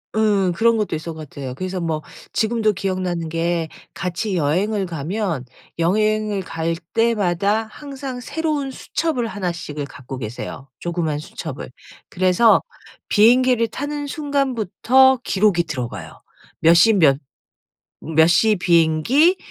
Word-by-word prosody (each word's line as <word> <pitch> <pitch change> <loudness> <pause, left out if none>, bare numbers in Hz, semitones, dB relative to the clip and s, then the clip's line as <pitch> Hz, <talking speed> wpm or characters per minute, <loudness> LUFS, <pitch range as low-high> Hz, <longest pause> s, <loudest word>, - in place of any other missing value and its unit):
응. 205 -4 +2
그런 225 +6 +3
것도 210 -6 -1
있었던 160 +1 -6
것 155 -3 -9
같아요. 130 -3 -7
그래서 185 +3 -4
뭐 160 -2 -2 0.3
지금도 220 -1 +1
기억나는 180 -4 -2
게 165 0 -1 0.3
같이 185 +2 -2
여행을 190 +7 0
가면 170 - -3 0.4
여행을 215 +3 +1
갈 165 -1 -3 0.2
때마다 210 -2 +1
항상 275 -3 -7
새로운 295 0 -2
수첩을 265 -1 -2
하나씩을 170 -8 -4
갖고 135 -2 -9
계세요 125 +4 -7
조그마한 165 -3 -2
수첩을. 150 -4 -7 0.4
그래서 185 +5 +4 0.5
비행기를 240 +2 +4
타는 290 +4 -4
순간부터 265 - +2
기록이 190 -3 +2
들어가요. 120 - -6 0.4
몇 165 +1 +6
십 210 +4 +5
몇 140 -4 +5 0.8
몇 160 0 +3
시 210 +5 +4
비행기 175 - +3
185 Hz, 275 characters per minute, -21 LUFS, 165-230 Hz, 0.8 s, 몇